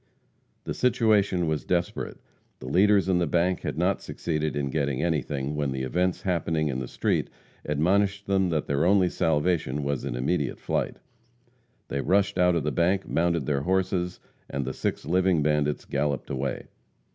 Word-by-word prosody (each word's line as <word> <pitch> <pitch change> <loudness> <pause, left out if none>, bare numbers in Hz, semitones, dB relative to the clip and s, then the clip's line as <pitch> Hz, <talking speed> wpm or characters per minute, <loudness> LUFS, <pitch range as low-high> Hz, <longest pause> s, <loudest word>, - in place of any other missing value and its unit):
The - - -3
situation 105 -7 +2
was 80 -2 -1
desperate. 90 -1 -2 0.4
The - - -11
leaders 100 +7 +4
in 90 -2 +3
the 85 - +1
bank 90 +3 +1
had - - -4
not - - +1
succeeded 75 -2 -2
in 70 -2 -2
getting 70 -3 -1
anything, 75 -3 -1
when 75 -2 -1
the 65 0 -3
events 90 +7 0
happening 85 -4 0
in 65 -2 -2
the 65 - -4
street - - -1 0.4
admonished 100 +7 +1
them 95 -2 +2
that 80 -3 0
their 70 +1 0
only 95 0 +4
salvation 75 -3 0
was 70 -1 -2
in - - -3
immediate 70 +4 -1
flight. - - -2 0.9
They 70 - -1
rushed 95 +2 +1
out 90 -1 +4
of 85 - 0
the - - 0
bank, 95 +3 +1
mounted 85 -3 +1
their 70 0 0
horses, 90 +1 0 0.3
and 70 -1 -3
the 65 - -3
six - - -3
living 90 -1 +2
bandits 75 -1 0
galloped 70 -3 -2
away. 65 +1 -3
85 Hz, 170 wpm, -26 LUFS, 70-90 Hz, 0.9 s, leaders